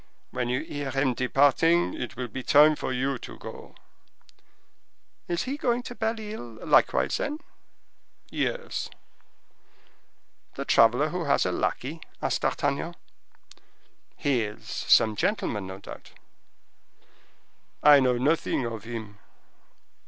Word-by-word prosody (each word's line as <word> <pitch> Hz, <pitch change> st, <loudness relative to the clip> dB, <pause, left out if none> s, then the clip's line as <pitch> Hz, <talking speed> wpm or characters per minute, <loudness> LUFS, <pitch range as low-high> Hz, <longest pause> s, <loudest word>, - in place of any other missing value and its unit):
"When 125 Hz, -1 st, -2 dB
you 125 Hz, +3 st, 0 dB
hear 145 Hz, -3 st, -5 dB
him 135 Hz, -1 st, +1 dB
departing, 145 Hz, +7 st, +3 dB
it 125 Hz, -, -5 dB
will 125 Hz, 0 st, -4 dB
be 125 Hz, +4 st, -6 dB
time 150 Hz, +4 st, +6 dB
for 130 Hz, -, -4 dB
you 130 Hz, +1 st, -1 dB
to -, -, -10 dB
go." -, -, -10 dB, 1.5 s
"Is 170 Hz, -1 st, -1 dB
he 270 Hz, +3 st, -3 dB
going 245 Hz, -3 st, 0 dB
to 245 Hz, -, -7 dB
Belle 225 Hz, -1 st, -2 dB
Isle, 120 Hz, -, -8 dB
likewise, 65 Hz, +2 st, +3 dB
then?" 290 Hz, +1 st, -2 dB, 0.9 s
"Yes." 485 Hz, -1 st, -2 dB, 1.7 s
"The -, -, -4 dB
traveler -, -, +4 dB
who -, -, -3 dB
has -, -, +2 dB
a -, -, 0 dB
lackey?" -, -, -2 dB, 0.2 s
asked -, -, -1 dB
D'Artagnan. -, -, -1 dB, 1.2 s
"He 140 Hz, -5 st, +1 dB
is 105 Hz, -1 st, -6 dB
some 110 Hz, -1 st, +3 dB
gentleman, 105 Hz, -, -1 dB
no 95 Hz, 0 st, -7 dB
doubt?" 95 Hz, -, -11 dB, 1.7 s
"I 145 Hz, -1 st, +9 dB
know 125 Hz, -2 st, +2 dB
nothing 140 Hz, -1 st, +1 dB
of 115 Hz, -2 st, -6 dB
him." 110 Hz, -3 st, -7 dB
135 Hz, 125 wpm, -27 LUFS, 120-165 Hz, 1.7 s, I